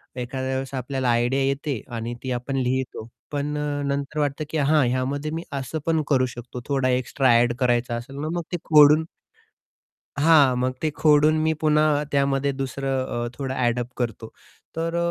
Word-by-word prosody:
एखाद्या 130 +1 -3
वेळेस 135 +1 -4
आपल्याला 130 0 -2
आयडिया 120 +3 +2
येते 140 -3 -1
आणि 115 +1 -4
ती 130 - -3
आपण 125 +3 -3
लिहितो. 130 -3 -2 0.2
पण 145 +1 -2
अ, 145 -1 -2
नंतर 140 +2 -2
वाटतं, 145 0 -1
की 160 - -2
हां, 150 -1 +3
ह्यामध्ये 140 +4 -2
मी 165 +1 -4 0.2
असं 145 +4 -4
पण 160 -1 +2
करू 130 -3 +3
शकतो. 120 +1 -8
थोडा 135 -2 +1
एक्स्ट्रा 130 0 +2
एड 120 0 +2
करायचा 120 -1 +1
असेल 130 +4 -7
ना, 155 +2 -3
मग 170 - -2
ते - - +1
खोडून 150 0 +6 1.1
हां. 145 -4 +5
मग 130 +1 0
ते 155 - +1
खोडून 150 0 +4
मी 160 - +2
पुन्हा 150 -1 +3
त्यामध्ये 140 0 +1
दुसरं 135 0 -2 0.2
अ, - - -3
थोडं 135 -2 -3
एड-अप 120 0 -1
करतो. 115 -2 -3 0.5
तर 165 +1 -2
135 Hz, 170 wpm, -24 LUFS, 125-150 Hz, 1.1 s, खोडून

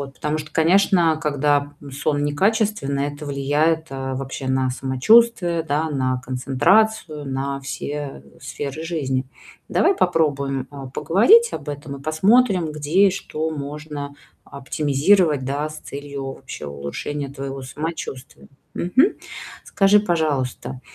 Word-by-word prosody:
Вот. 135 -1 -7
Потому 150 +1 -2
что, 150 0 -7
конечно, 170 -1 +3
когда 145 -1 +1 0.2
сон 145 +1 -1
некачественный- 145 -3 0
это 145 +1 -9
влияет, 150 +4 0
э, 135 -1 -4
вообще 135 0 -5
на 130 0 +1
самочувствие, 170 - +3
да, 155 +1 -1
на 130 -3 -1
концентрацию, 150 +6 +1
на 135 +1 -3
все 140 - -5 0.2
сферы 145 +3 -5
жизни. 140 -6 -1 0.4
Давай 390 - +3
попробуем, 140 - 0
а, 140 -2 -8
поговорить 385 - +4
об - - -6
этом 145 -1 -6
и 135 - -12
посмотрим, 185 - +3
где 155 +7 +3
и - - 0
что 160 -4 -4
можно 145 -1 -6 0.3
оптимизировать, 145 +3 +1
да, 140 +3 -2
с 155 0 -9
целью 140 -1 -6
вообще 130 - -9
улучшения 70 - -5
твоего 135 0 -6
самочувствия. 140 -1 -6 0.3
Мгм. 260 - +2 0.5
Скажи, 200 +1 +4
пожалуйста, 150 - -1
145 Hz, 125 wpm, -22 LUFS, 135-165 Hz, 0.5 s, поговорить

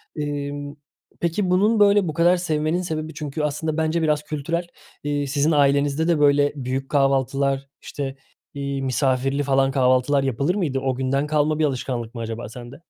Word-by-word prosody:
Emm, 145 -1 -4 0.4
peki 175 +3 0
bunun, 210 +5 +3
böyle 205 -2 +5
bu 155 - -2
kadar 175 +3 +4
sevmenin 160 0 0
sebebi 160 -2 -4
çünkü 150 0 -4
aslında 150 +1 -2
bence 160 +1 0
biraz 150 -2 +1
kültürel. 165 +4 -3 0.4
Eee, 145 -1 -1
sizin 145 +3 +1
ailenizde 145 +1 +2
de 170 -3 +2
böyle 145 0 +4
büyük 135 0 -3
kahvaltılar, 135 0 +1
işte, 135 -2 -5 0.4
iii, 140 -1 -3
misafirli 135 +1 0
falan 135 -1 +2
kahvaltılar 130 +1 +2
yapılır 135 +7 0
mıydı? 155 -10 -1
O 130 -1 -1
günden 135 +3 0
kalma 150 0 +1
bir 155 - +3
alışkanlık 125 -4 -3
mı 115 - -5
acaba 115 -1 -5
sende? 120 +2 -10
145 Hz, 165 wpm, -23 LUFS, 135-155 Hz, 0.4 s, böyle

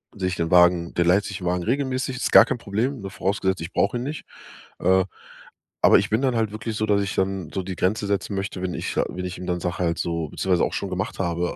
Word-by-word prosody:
sich 90 -2 -2
den 85 -1 -2
Wagen 90 -1 +4
der 85 - +2
leiht 95 +4 +4
sich 100 - -5
den 90 - -4
Wagen 90 0 0
regelmäßig. 130 +1 -1
Ist - - -2
gar - - +11
kein - - -2
Problem, 115 +6 -2
ne, 95 - -6
vorausgesetzt, 95 -2 -1
ich 85 - -6
brauch 100 - +2
ihn 120 - -2
nicht. 150 +2 -5 0.5
Äh, 95 +1 +3 0.8
aber - - +7
ich 100 - -2
bin 110 +4 +1
dann 130 -3 +1
halt 110 -2 0
wirklich 110 0 -5
so, 110 - 0
dass 100 -1 +2
ich 100 - -3
dann 95 -3 -1
so 95 - -2
die 95 0 -5
Grenze 100 +2 0
setzen 100 0 -1
möchte, 95 -1 -4
wenn 90 -1 -2
ich - - -3
sa - - +1
wenn 90 0 -5
ich 90 - -5
ihm 90 - -7
dann 90 -1 -1
sag 90 +1 -3
halt 85 -2 0
so 85 -2 -2
beziehungsweise 90 -2 +1
auch - - -4
schon 100 - -3
gemacht 95 0 -3
habe 85 -1 -1
95 Hz, 260 wpm, -24 LUFS, 90-105 Hz, 0.8 s, gar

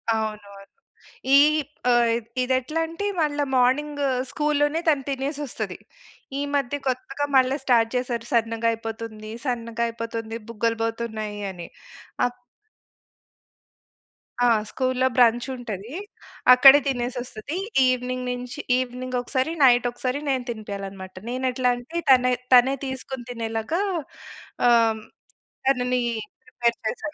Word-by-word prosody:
అవునవును. 205 -2 -5 0.7
ఈ - - +9 0.5
ఆహ్, 235 -1 +3 0.2
ఇది 250 +1 +1
ఎట్లా 305 +6 -4
అంటే 330 +5 -5 0.2
మళ్ళా 295 -1 +1
మార్నింగ్ 285 +4 +2 0.3
స్కూల్‌లోనే 295 +1 +1
తను 285 -3 +2
తినేసొస్తది. 280 +1 -4 0.6
ఈ - - -1
మధ్య 280 0 0
కొత్తగా 265 +3 -2
మళ్ళా 260 +1 +3
స్టార్ట్ 230 -3 +3
చేశారు. 245 -2 -2
సన్నగా 230 0 +1
అయిపోతుంది. 225 -1 -6
సన్నగా 235 -2 -2
అయిపోతుంది. 230 -1 -5
బుగ్గలు 230 0 -1
పోతున్నాయి 220 -2 -3
అని. 175 -2 -9 0.6
ఆ - - +4 2.2
ఆహ్, 225 -3 +4
స్కూల్‌లో 255 +1 +1
బ్రంచ్ 240 0 +4
ఉంటది. 230 - -7 0.6
అక్కడే 270 +3 +9
తినేసి 245 -1 -2
వస్తది. 245 +6 -6 0.3
ఈవెనింగ్ 255 0 -1
నుంచి 250 +3 -6 0.2
ఈవెనింగ్ 255 0 -3
ఒకసారి, 260 +4 -1
నైట్ 245 -2 +6
ఒకసారి 255 +3 -3
నేను 260 -2 0
తినిపియాలన్నమాట. 200 -4 -6
నేను 255 +2 -2
ఎట్లా 250 0 +1
అంటే 265 +8 -5
తనే, 250 -1 +6 0.2
తనే 250 +2 +7
తీసుకొని 265 -1 -6
తినేలాగా 230 - -2 0.9
ఆహ్, 225 -2 +4 0.7
తనని 250 -1 +2 0.4
ప్రిపేర్ 235 -1 0
చేశాను. 295 +7 -3
245 Hz, 115 wpm, -24 LUFS, 230-265 Hz, 2.2 s, ఈ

